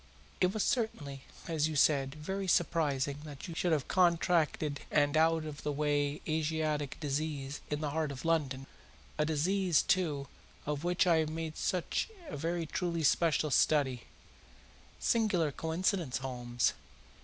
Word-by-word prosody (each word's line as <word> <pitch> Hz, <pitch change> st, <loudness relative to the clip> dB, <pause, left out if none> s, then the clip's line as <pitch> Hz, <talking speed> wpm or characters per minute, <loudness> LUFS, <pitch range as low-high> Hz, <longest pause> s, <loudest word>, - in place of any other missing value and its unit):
It 185 Hz, 0 st, +3 dB
was 215 Hz, 0 st, -1 dB
certainly, 145 Hz, -, -2 dB, 0.2 s
as 155 Hz, -2 st, +1 dB
you 155 Hz, -, -4 dB
said, 140 Hz, -2 st, +3 dB
very 190 Hz, +6 st, -4 dB
surprising 145 Hz, -5 st, +1 dB
that 145 Hz, -3 st, -9 dB
he 170 Hz, -, -6 dB
should 175 Hz, +1 st, 0 dB
have 150 Hz, -5 st, +1 dB
contracted 170 Hz, -4 st, +2 dB
an 145 Hz, 0 st, +2 dB
out 160 Hz, 0 st, +3 dB
of 150 Hz, -1 st, -7 dB
the 150 Hz, -, -2 dB
way 145 Hz, 0 st, 0 dB
Asiatic 155 Hz, -2 st, -1 dB
disease 145 Hz, -1 st, -3 dB
in 150 Hz, 0 st, -2 dB
the 150 Hz, -2 st, -1 dB
heart 155 Hz, -1 st, -1 dB
of 135 Hz, +3 st, -8 dB
London 140 Hz, -5 st, 0 dB, 0.5 s
a 150 Hz, -, +3 dB
disease, 175 Hz, +3 st, +2 dB
too, 150 Hz, -7 st, +1 dB, 0.4 s
of 150 Hz, 0 st, -2 dB
which 175 Hz, 0 st, +2 dB
I 170 Hz, -2 st, +4 dB
had 160 Hz, -1 st, +1 dB
made 160 Hz, 0 st, -4 dB
such 180 Hz, -, -1 dB, 0.2 s
a -, -, -5 dB
very 165 Hz, +2 st, -2 dB, 0.4 s
special 155 Hz, 0 st, +2 dB
study. 135 Hz, -5 st, +2 dB, 0.9 s
Singular 200 Hz, -10 st, +2 dB
coincidence, 165 Hz, -, -1 dB
Holmes. 120 Hz, -2 st, -1 dB
155 Hz, 145 wpm, -32 LUFS, 145-170 Hz, 0.9 s, I